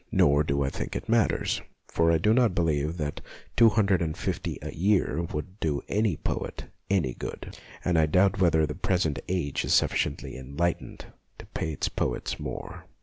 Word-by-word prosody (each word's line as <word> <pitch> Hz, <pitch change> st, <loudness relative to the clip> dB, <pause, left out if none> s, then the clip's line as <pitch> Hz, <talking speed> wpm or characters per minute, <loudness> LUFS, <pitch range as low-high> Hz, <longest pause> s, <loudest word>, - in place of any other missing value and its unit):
Nor 70 Hz, +1 st, +4 dB
do 70 Hz, -1 st, 0 dB
I 70 Hz, -, -1 dB
think -, -, -5 dB
it -, -, -4 dB
matters, 115 Hz, -2 st, +2 dB, 0.3 s
for 85 Hz, 0 st, +2 dB
I 85 Hz, -, +4 dB
do 105 Hz, +7 st, +3 dB
not 115 Hz, -6 st, +3 dB
believe 80 Hz, -1 st, 0 dB
that 75 Hz, -3 st, -3 dB, 0.3 s
two 115 Hz, -1 st, +7 dB
hundred 100 Hz, -4 st, +2 dB
and 80 Hz, -2 st, -2 dB
fifty -, -, -3 dB
a -, -, -5 dB
year 95 Hz, -3 st, +2 dB
would 75 Hz, +7 st, -5 dB
do 75 Hz, -3 st, -1 dB
any 105 Hz, -6 st, +1 dB
poet -, -, -4 dB, 0.2 s
any 85 Hz, -11 st, +1 dB
good, -, -, -7 dB, 0.3 s
and 85 Hz, -2 st, +3 dB
I 80 Hz, -, +4 dB
doubt 95 Hz, +6 st, +3 dB
whether 80 Hz, -3 st, +4 dB
the 75 Hz, -, -4 dB
present 90 Hz, -9 st, 0 dB
age 85 Hz, -6 st, -1 dB
is -, -, +3 dB
sufficiently 70 Hz, -, 0 dB
en 65 Hz, +2 st, -10 dB
lightened 85 Hz, 0 st, -1 dB, 0.3 s
to -, -, -11 dB
pay 80 Hz, -, -3 dB
its 70 Hz, -, -1 dB
poets -, -, -2 dB
more. -, -, -6 dB
85 Hz, 185 wpm, -27 LUFS, 75-95 Hz, 0.3 s, two